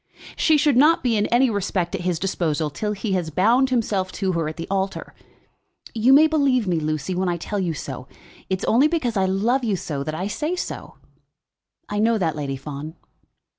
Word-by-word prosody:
"She 315 -1 +3
should 290 -3 +3
not 310 +5 +5
be 240 -3 +2
in 205 -1 +1
any 250 +3 +3
respect 190 -3 -2
at 195 - -3
his 180 -2 -1
disposal 160 -5 -1
till 210 +8 -3
he 200 0 -3
has 175 -4 -1
bound 230 - +3
himself 205 -7 0
to 190 -2 -1
her 165 -3 -1
at 155 - -9
the 165 - -5
altar. 195 0 -3 0.8
You 230 +3 +3
may 290 +3 +8
believe 280 -8 +2
me, 175 -3 +1
Lucy, 155 +3 -2
when 180 0 0
I 175 - -1
tell 205 +4 -4
you 175 -4 -1
so. 130 -2 -7 0.4
It 190 - +1
is - - -2
only 260 +6 +4
because 305 -8 -1
I 190 -1 +2
love 225 +8 +1
you 215 -4 +1
so 150 -6 -4
that 155 +2 -4
I 180 +4 -3
say 300 - -2
so." - - -6 0.9
"I 205 - -3
know 225 +1 +3
that, 165 -6 -1
Lady 140 -2 -3
Fawn." 150 +3 -7
195 Hz, 210 wpm, -22 LUFS, 165-240 Hz, 0.9 s, may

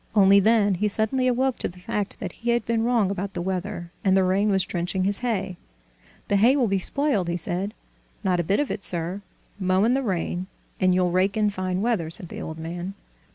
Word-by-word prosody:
Only 200 -1 +7
then 210 -1 +4
he 200 +4 0
suddenly 220 +5 +1
awoke 255 +1 +1
to - - -1
the 175 - -11
fact 200 +2 -3
that 185 - -4
he 240 +6 -5
had 235 0 +2
been 225 -1 0
wrong 230 -5 +2
about 195 0 -4
the - - -2
weather 185 -1 -4
and 190 -1 +4
the 190 - +4
rain 195 +3 +2
was 190 -2 +2
drenching 180 +2 -2
his 200 +1 0
hay. 205 -7 -2 0.7
"The 205 - +2
hay 235 +7 +5
will 260 -5 +2
be 195 -1 +1
spoiled," 275 - 0
he 170 - -1
said. 180 +4 -3 0.5
"Not 180 -2 +1
a - - +1
bit 195 +5 +1
of 290 - 0
it, 200 - -4
sir; 175 +3 -2 0.4
mow 185 0 +2
in 235 +3 +3
the 270 - +1
rain, 185 -4 -2 0.3
and 185 -1 +3
you'll 180 -1 +2
rake 190 +3 +1
in 210 -1 +2
fine 185 0 -2
weather!" 220 -9 0
said 165 +1 -1
the - - -7
old 160 - -6
man. 175 +4 -5
195 Hz, 225 wpm, -24 LUFS, 180-220 Hz, 0.7 s, Only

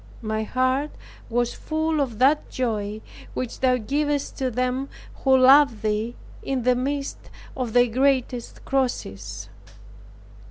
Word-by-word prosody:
My 215 0 -1
heart 255 +5 0 0.4
was 240 0 0
full 315 -1 -1
of 245 -6 -2
that 275 +5 +3
joy 215 -4 -2 0.3
which 250 -2 -4
Thou 255 -1 +3
givest 285 +5 -1
to 260 -1 0
them 255 +3 -1 0.3
who 265 -1 +5
love 260 -3 +6
Thee, 215 +2 -1 0.3
in 265 -3 -2
the 250 +1 +4
midst 275 +2 -3 0.3
of 250 -4 -3
their 245 0 +6
greatest 255 0 0
crosses. 265 -2 -2
255 Hz, 125 wpm, -24 LUFS, 235-275 Hz, 0.4 s, love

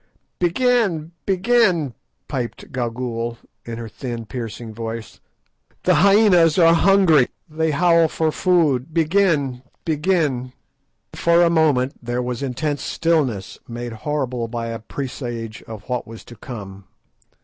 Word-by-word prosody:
'" - - -50
"Begin! 180 -4 +1 0.2
begin!" 190 - +2 0.3
piped 125 -4 -5
Gagool, 120 -1 -3 0.3
in 115 -1 -6
her 115 -1 -6
thin 115 +1 -6
piercing 115 -1 -6
voice; 115 0 -6 0.6
"the 185 - +3
hyænas 180 -2 +5
are 165 -2 +6
hungry, 170 -6 +5 0.2
they 160 +1 -1
howl 165 +2 +4
for 160 0 0
food. 155 -5 +1
Begin! 160 -7 +2 0.2
begin!" 155 -4 +1 0.7
Then - - -9
for 170 +1 +5
a 170 - +3
moment 145 -5 +2
there 120 +1 -2
was 125 0 -4
intense 140 +2 -2
stillness, 140 - -1
made 120 0 -6
horrible 125 -1 -2
by 115 0 -4
a 115 0 -4
presage 120 -3 -6
of 110 -2 -8
what 125 0 -3
was 115 0 -11
to 120 - -12
come. 100 -4 -9
140 Hz, 130 wpm, -21 LUFS, 120-170 Hz, 0.7 s, are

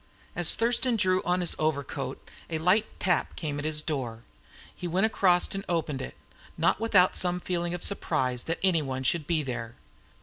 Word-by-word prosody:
As 175 -2 +4
Thurston 235 +2 +2
drew 185 -3 +2
on 180 +1 +1
his 175 - 0
overcoat 155 -3 -2 0.2
a 160 - -1
light 185 +7 +3
tap 180 -3 0
came 150 -3 -3
at 145 - -5
his 150 -1 +2
door, 135 -7 -2
and 115 +1 -17 0.5
he 180 - -5
went 185 +5 +2
across 185 -5 +2
and 195 0 -4
opened 155 -6 -1
it, 130 - -7 0.4
not 165 +4 +2
without 200 -5 +4
some 180 0 +1
feeling 175 -1 -2
of 175 - -7
surprise 130 -10 -1
that 165 - -1
anyone 145 -8 +1
should 150 +3 0
be 160 -3 +1
there. 120 -3 -5
170 Hz, 180 wpm, -28 LUFS, 145-185 Hz, 0.5 s, As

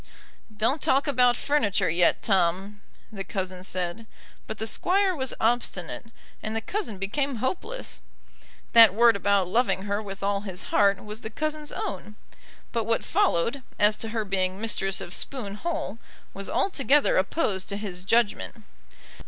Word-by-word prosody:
"Don't 260 +8 +1
talk 275 +2 +2
about 250 -4 +3
furniture 215 -10 +1
yet, 170 +2 +2
Tom," 195 +1 +1 0.3
the 195 -3 -5
cousin 185 -1 -4
said; 185 +4 -4 0.4
but - - -5
the 220 - -3
Squire 375 - +1
was 260 -3 -1
obstinate, 230 -4 -1 0.3
and 215 0 -4
the - - +1
cousin 230 - -4
became 270 +9 -1
hopeless. 355 - -3 0.7
That 225 -4 +8
word 235 0 +6
about 200 -2 +2
loving 225 -1 +1
her 205 +1 -1
with 195 -2 -8
all 200 0 0
his 190 -3 -7
heart 200 -1 +3
was 210 +2 -8
the 220 - -6
cousin's 305 +4 -4
own, 200 +2 -5 0.6
but 230 -2 -1
what 230 +1 0
followed, 280 - +1 0.2
as 210 +1 +5
to 225 - -4
her 220 -1 -2
being 190 -1 -1
mistress 195 -3 -1
of 175 - -5
Spoon 230 -6 -3
Hall, 230 - -4 0.3
was 195 0 -5
altogether 290 -5 +2
opposed 190 - -1
to 200 - -2
his 195 -4 -6
judgment. 200 - 0
210 Hz, 150 wpm, -26 LUFS, 195-250 Hz, 0.7 s, That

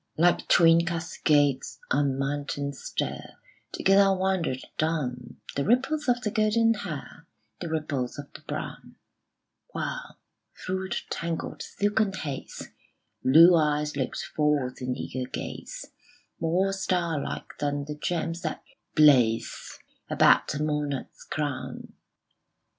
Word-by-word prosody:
Like 175 +2 +3
twin 165 0 +6
cascades 155 -5 +1
on 140 -1 +2
mountain 140 0 -2
stair - - -4 0.4
Together 195 0 +4
wandered 185 -8 0 0.2
down 130 -6 -2 0.2
The 140 - 0
ripples 265 - +1
of 245 0 +2
the 210 - -1
golden 225 +1 +3
hair, 165 -4 -7 0.3
The 170 - -4
ripples 145 -5 -2
of 145 0 -9
the - - -11
brown: - - -6 0.8
While, - - -4 0.5
through 190 0 -2
the - - -2 0.2
tangled 170 -1 -3
silken 205 0 0
haze, 145 -7 -6 0.5
Blue 165 +6 +8
eyes 150 -2 +1
looked 130 -3 -2
forth 145 -4 +1
in 125 0 -2
eager 130 0 -4
gaze, - - -7 0.5
More 180 +4 +1
starlike 175 -6 -2
than 145 -1 -1
the 150 - -5
gems 165 +2 -2
that 155 -4 -4 0.3
blaze 125 -7 +4 0.3
About - - +4
a 150 - -1
monarch's 150 -3 -3
crown. 145 -4 -4
155 Hz, 115 wpm, -27 LUFS, 140-185 Hz, 0.8 s, Blue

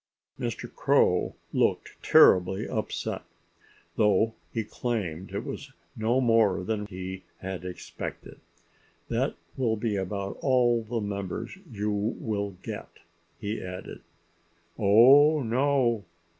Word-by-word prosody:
Mr. - - -3
Crow - - +2 0.2
looked - - +1
terribly 95 +3 +5
upset, 110 -3 -3 0.8
though 105 +1 +3 0.2
he 115 - -1
claimed 100 -7 -3
it 100 - -4
was 140 -2 -7 0.2
no 115 +2 +1
more 115 -7 +3
than 105 +1 -2
he 95 -1 -6 0.2
had 95 -1 -6
expected. 90 -1 -7 0.7
"That - - 0 0.2
will 120 -4 +1
be 105 -1 -1
about 100 +1 -3
all 120 -3 +3
the 115 +1 -3
members 100 - -4 0.2
you 105 -1 -2
will 100 -1 -2
get," - - -6 0.5
he 105 +2 -3
added. 90 0 -7 0.7
"Oh, 135 +9 +6
no!" 120 -3 +1
105 Hz, 110 wpm, -27 LUFS, 100-120 Hz, 0.8 s, Oh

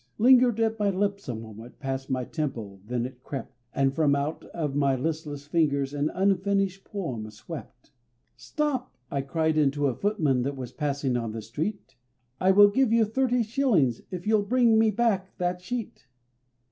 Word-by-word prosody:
Lingered 245 -1 +5
at 225 0 +1
my 205 -1 +2
lips 200 -3 -1
a 120 - -2
moment, 110 +1 -10
past 135 0 -4
my 130 -1 0
temple 115 - -4
then 120 0 -1
it 125 0 -9
crept, 135 -1 -6 0.2
And 135 0 +1
from 145 -2 +3
out 140 +3 -2
of 150 -5 -3
my 140 -1 +2
listless 150 0 -3
fingers 145 -3 +1
an 145 +1 0
unfinished 195 0 +1
poem 130 - -5
swept: 125 +3 -10 0.4
"Stop!" 290 -5 -2 0.2
I 140 - 0
cried 160 +3 0
unto 145 0 +2
a 135 - +2
footman 155 -11 +1
that 140 +2 -2
was 125 -2 -6
passing 140 -2 -1
on 115 -2 -2
the 110 - -5
street, 155 - -5 0.4
"I 185 - +3
will 205 +1 +8
give 250 +3 +2
you 230 -1 +4
thirty 245 +2 +1
shillings 215 - +1
if 180 -1 -6
you'll 215 -1 +3
bring 230 +1 +3
me 220 0 +4
back 205 -4 0
that 180 0 -1
sheet." 220 - -5
160 Hz, 170 wpm, -27 LUFS, 135-205 Hz, 0.4 s, will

